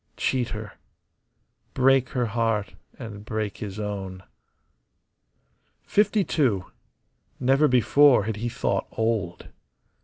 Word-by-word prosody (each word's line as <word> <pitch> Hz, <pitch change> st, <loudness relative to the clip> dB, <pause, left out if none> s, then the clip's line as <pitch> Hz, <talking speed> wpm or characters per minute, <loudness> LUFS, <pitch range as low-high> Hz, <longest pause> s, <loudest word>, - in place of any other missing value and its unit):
Cheat 125 Hz, -3 st, 0 dB
her. 105 Hz, -2 st, -8 dB, 1.0 s
Break 130 Hz, -1 st, +3 dB
her 125 Hz, -2 st, -1 dB
heart 115 Hz, -2 st, -1 dB, 0.2 s
and 105 Hz, -4 st, -8 dB
break 110 Hz, -1 st, -4 dB
his 105 Hz, -2 st, -6 dB
own. 95 Hz, -3 st, -5 dB, 1.6 s
Fifty 210 Hz, 0 st, +2 dB
two. 115 Hz, -, 0 dB, 0.7 s
Never 135 Hz, +4 st, +3 dB
before 130 Hz, 0 st, +5 dB
had 110 Hz, 0 st, -3 dB
he 120 Hz, +3 st, -3 dB
thought -, -, -2 dB
old. 110 Hz, -6 st, -2 dB
115 Hz, 100 wpm, -25 LUFS, 105-130 Hz, 1.6 s, before